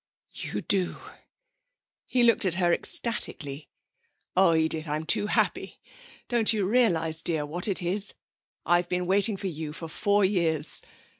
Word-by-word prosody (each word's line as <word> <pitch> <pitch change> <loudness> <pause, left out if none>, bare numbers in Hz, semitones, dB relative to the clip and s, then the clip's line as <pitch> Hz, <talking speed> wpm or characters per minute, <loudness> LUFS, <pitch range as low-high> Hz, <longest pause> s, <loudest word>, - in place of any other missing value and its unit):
'You - - -4
do!' 185 -3 0 1.1
He 250 -1 +1
looked 230 -2 +3
at 185 -3 +1
her 175 -2 +2
ecstatically. 150 - 0 0.7
'Oh, 185 -3 +4
Edith! 160 0 -1
I'm 150 +2 -3
too 205 - +1
happy! - - -1 0.5
Do 240 - -1
you - - +1 0.2
quite 190 - -2
realise, 165 -10 +1
dear, 160 -4 -2
what 175 +6 -1
it 190 -3 +2
is?... 195 +4 +2 0.5
I've 175 0 +1
been 180 0 -2
waiting 200 +3 +3
for 195 - -8
you 155 -4 -5
for 165 +2 -7
four 205 +5 +1
years. 165 -6 -1
175 Hz, 150 wpm, -26 LUFS, 160-200 Hz, 1.1 s, Oh